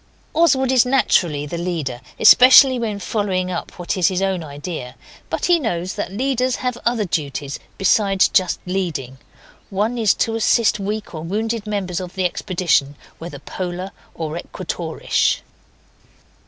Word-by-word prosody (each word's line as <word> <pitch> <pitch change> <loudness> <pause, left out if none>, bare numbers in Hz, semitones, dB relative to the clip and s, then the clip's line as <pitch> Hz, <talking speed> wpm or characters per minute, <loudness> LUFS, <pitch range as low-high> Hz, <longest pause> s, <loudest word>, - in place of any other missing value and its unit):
Oswald 275 -5 +3
is 255 -3 +5
naturally 175 - +1
the 170 +3 -5
leader, 155 -9 -3 0.2
especially 255 0 +8
when 220 -3 -2
following 195 -3 -2
up 175 - -6
what 175 +3 -3
is 185 -2 +3
his 185 -2 0
own 190 -3 -1
idea, 145 -3 -7 0.3
but - - -2
he 350 -1 +4
knows 185 - -2
that - - -4
leaders 255 +3 0
have 250 -1 -2
other 235 -3 +1
duties 145 -4 -3 0.2
besides 195 0 +3
just 185 -2 +1
leading. 170 -9 -3 0.5
One 215 +5 -1
is 215 -4 +3
to 225 - 0
assist 225 -1 +2
weak 210 +1 -4
or 155 - -6
wounded 215 +5 -3
members 195 -4 -2
of 185 0 -8
the 190 -1 -1
expedition, 170 -6 0 0.2
whether 170 +2 -7
Polar 185 +1 -5 0.2
or 160 -1 -4
Equatorish. 170 -2 -2
190 Hz, 145 wpm, -20 LUFS, 170-225 Hz, 0.5 s, especially